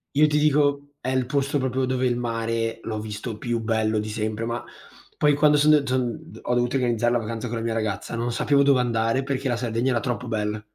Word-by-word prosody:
Io 150 +2 +6
ti 150 0 +1
dico, 145 -1 +2
è - - -7
il 130 -1 +1
posto 140 +2 0
proprio 130 -1 0
dove 130 0 0
il 120 -1 +1
mare 115 -1 -2
l'ho 110 -1 -3
visto 105 +1 -5
più 120 +1 -2
bello 110 -1 0
di 105 0 -2
sempre 110 +1 -3
ma 115 0 -2 0.6
poi 150 -1 +4
quando 150 +1 +4
son 150 +1 +5
d 150 -2 +5
t 130 - -2 0.5
ho 125 - -1
dovuto 120 +1 +1
organizzare 120 -2 +1
la 120 - +2
vacanza 115 +1 -4
con 120 - -4
la 115 - -3
mia 115 -1 -1
ragazza 110 0 -3
non 120 +1 -2
sapevo 140 +3 +3
dove 140 -2 +4
andare 115 +1 0
perché 135 0 -2
la 120 - +1
Sardegna 120 +2 -1
era 120 -2 +1
troppo 125 +2 -3
bella. 105 -1 -2
120 Hz, 230 wpm, -24 LUFS, 115-135 Hz, 0.6 s, Io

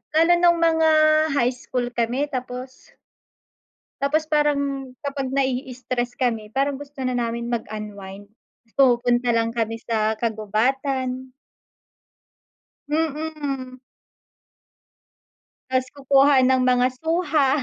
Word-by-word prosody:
Lalo 330 +2 +5
nung 345 -1 +4
mga 320 -1 +4 0.5
high 245 -2 +2
school 250 -1 -4
kami 240 +5 -1
tapos. 255 0 -7 1.1
Tapos 310 +3 0
parang 280 -3 0
kapag 275 -2 -4
na-i-stress 255 -2 -2
kami, 225 -4 -2
parang 275 +1 0
gusto 285 -1 -10
na 255 -1 -1
namin 235 0 -2
mag-unwind 205 -3 -6 0.5
pumupunta 245 -2 +3
lang 230 0 +1
kami 225 -1 -2
sa 220 -1 0
kagubatan. 255 +4 -1 1.6
Mm. 300 -4 -3 1.9
Tas 255 0 +1
kukuha 280 0 +4
ng 260 -1 +3
mga 250 0 +3
suha, 320 -4 +1
260 Hz, 95 wpm, -23 LUFS, 240-280 Hz, 1.9 s, Lalo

